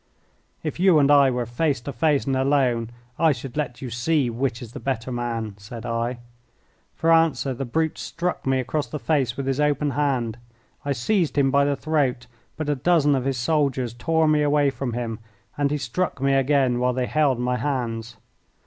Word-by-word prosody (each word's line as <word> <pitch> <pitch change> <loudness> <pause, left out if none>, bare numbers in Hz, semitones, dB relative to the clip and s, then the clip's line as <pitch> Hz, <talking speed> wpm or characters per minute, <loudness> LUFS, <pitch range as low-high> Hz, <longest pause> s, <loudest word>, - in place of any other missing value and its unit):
"If 155 0 -4
you 185 -3 +5
and 145 -1 +4
I 140 -2 +6
were 125 -1 -1
face 135 +4 0
to 140 - -6
face 150 -4 +1
and 135 -1 0
alone, 130 -4 +1 0.3
I 165 -1 +5
should 130 -1 -6
let 135 -4 -3
you 125 - -5
see 135 +1 +1
which 120 0 -2
is 115 -3 -9
the - - -8
better 130 -2 -3
man," 115 -3 -3
said 115 +3 -9
I. 115 +1 -2 0.8
For 165 0 +1
answer 165 -4 +2
the 135 +2 -4
brute 160 +6 -1
struck 175 +1 -3
me 135 0 +2
across 140 +4 -2
the 150 - -5
face 135 -5 0
with 140 - -3
his 135 +1 -1
open 150 -1 +1
hand. 130 -6 -1 0.4
I 145 - -2
seized 155 - 0
him 135 -1 +3
by 140 +1 +4
the 145 0 +1
throat, 140 -5 0 0.3
but 155 -1 -3
a 150 - +2
dozen 145 +1 +3
of 130 -2 0
his 135 -2 0
soldiers 130 -3 0
tore 160 +7 +1
me 155 -1 +3
away 145 -1 +3
from 130 -2 -4
him, 115 -2 -3 0.4
and 145 -1 +1
he 150 - 0
struck 145 +5 -2
me 135 +1 +2
again 135 -2 +2
while 125 0 +1
they 125 0 -1
held 145 -2 +2
my 125 +1 0
hands. 120 -4 -3
135 Hz, 200 wpm, -24 LUFS, 120-150 Hz, 0.8 s, I